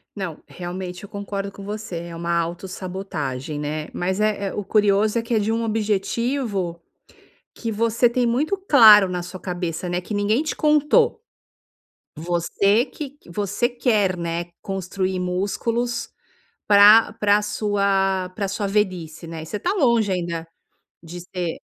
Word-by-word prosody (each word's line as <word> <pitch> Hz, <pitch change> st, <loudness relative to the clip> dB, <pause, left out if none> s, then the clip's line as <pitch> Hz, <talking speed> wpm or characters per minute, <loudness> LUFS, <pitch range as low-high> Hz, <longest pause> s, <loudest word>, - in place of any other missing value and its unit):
Não, 185 Hz, -6 st, -5 dB
realmente 180 Hz, +1 st, -6 dB
eu 200 Hz, -, -10 dB
concordo 200 Hz, 0 st, -5 dB
com 200 Hz, -, -11 dB
você, 210 Hz, -3 st, -5 dB
é 170 Hz, -1 st, -8 dB
uma 170 Hz, 0 st, -1 dB
autossabotagem, 170 Hz, -5 st, -4 dB
né, 150 Hz, +1 st, -3 dB
mas 185 Hz, +3 st, -2 dB
é 210 Hz, -2 st, +1 dB
é -, -, -4 dB
o 205 Hz, -, -3 dB
curioso 210 Hz, +1 st, +2 dB
é -, -, -1 dB
que 230 Hz, 0 st, -2 dB
é -, -, +3 dB
de 215 Hz, +2 st, 0 dB
um 230 Hz, +1 st, 0 dB
objetivo 215 Hz, -3 st, -1 dB, 0.7 s
que 230 Hz, -1 st, -4 dB
você 230 Hz, +2 st, +2 dB
tem 245 Hz, 0 st, +1 dB
muito 295 Hz, +12 st, 0 dB
claro 220 Hz, -, +7 dB
na 180 Hz, -1 st, -3 dB
sua 185 Hz, +1 st, -8 dB
cabeça, 175 Hz, -1 st, -4 dB
né, 175 Hz, +1 st, -1 dB
que 210 Hz, -, -7 dB
ninguém 210 Hz, +7 st, +1 dB
te 315 Hz, -, -3 dB
contou, 305 Hz, -, +3 dB, 1.0 s
você 175 Hz, -, +1 dB
que 290 Hz, -2 st, -8 dB
q 280 Hz, -11 st, -18 dB
você 205 Hz, +6 st, -1 dB
quer, 215 Hz, -7 st, +1 dB
né, 170 Hz, 0 st, -3 dB, 0.2 s
construir 190 Hz, -1 st, -3 dB
músculos 230 Hz, +6 st, -2 dB, 0.6 s
pra 210 Hz, +2 st, +7 dB
pra 210 Hz, 0 st, +4 dB
sua 200 Hz, -3 st, 0 dB
pra 200 Hz, +1 st, -2 dB
sua 200 Hz, +1 st, -2 dB
velhice, 185 Hz, -6 st, -2 dB
né. 160 Hz, -1 st, -6 dB
E -, -, -9 dB
você 210 Hz, +5 st, -5 dB
tá 370 Hz, -, 0 dB
longe 235 Hz, -, +2 dB
ainda 170 Hz, -2 st, -3 dB, 0.6 s
de 175 Hz, +2 st, -8 dB
ser 175 Hz, -1 st, -4 dB
200 Hz, 155 wpm, -22 LUFS, 180-220 Hz, 1.0 s, claro